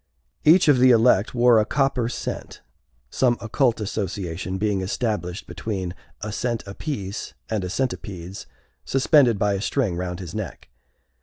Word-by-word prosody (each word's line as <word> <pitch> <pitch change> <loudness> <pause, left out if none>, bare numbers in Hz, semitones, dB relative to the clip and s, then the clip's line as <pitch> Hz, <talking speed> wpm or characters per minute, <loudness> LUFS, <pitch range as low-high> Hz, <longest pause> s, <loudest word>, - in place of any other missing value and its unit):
Each 165 +3 +6
of 145 -4 +5
the 130 +1 +6
elect 115 -2 +4
wore 120 -1 +6
a - - +3
copper 125 0 0
cent 120 - -6 0.5
(some 120 -2 +2
occult 120 +1 +1
association 95 -3 -3
being 100 -1 0
established 95 -3 -2
between 95 -5 -4 0.3
a 105 - -4
cent 115 +1 -2
apiece 100 -1 -5 0.2
and 105 -3 0
a 90 - -3
centipedes 95 -6 -4 0.4
suspended 135 -4 +4
by 100 +1 +1
a 100 - -2
string 115 -6 0
round 90 0 -4
his 90 -3 -7
neck). 110 -6 -6
110 Hz, 145 wpm, -23 LUFS, 95-125 Hz, 0.5 s, Each